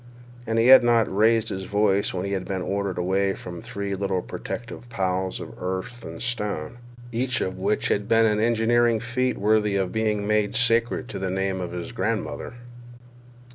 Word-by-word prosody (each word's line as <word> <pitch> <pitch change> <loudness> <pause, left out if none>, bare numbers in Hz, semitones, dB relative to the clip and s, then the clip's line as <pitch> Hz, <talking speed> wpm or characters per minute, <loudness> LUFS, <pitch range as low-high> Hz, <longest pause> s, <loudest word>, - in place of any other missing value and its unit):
And 115 0 0
he 115 - +4
had 130 -1 +10
not 115 -4 +2
raised 110 +2 +3
his 95 0 -4
voice 100 -1 +1
when 90 0 -3
he 100 - -3
had 95 -2 -2
been 95 -2 -3
ordered 100 -1 -2
away 95 +2 +1
from 85 -1 -8
three 100 0 -4
little 95 -1 -1
protective 120 +1 -7
piles 95 -3 -1
of - - -8
earth 95 +6 -4
and - - -8
stone, 105 -4 -3 0.3
each 125 +2 0
of 95 0 -2
which 100 +3 0
had 100 0 0
been 115 0 +4
an 105 -1 +2
engineering 115 +1 +3
feat 125 +2 -1
worthy 105 0 +2
of 95 -2 0
being 105 -2 0
made 105 0 +1
sacred 120 +1 +2
to 100 - -5
the 95 -1 -2
name 95 0 -1
of 90 - -4
his 90 -1 -5
grandmother. - - -3
105 Hz, 180 wpm, -24 LUFS, 95-115 Hz, 0.3 s, had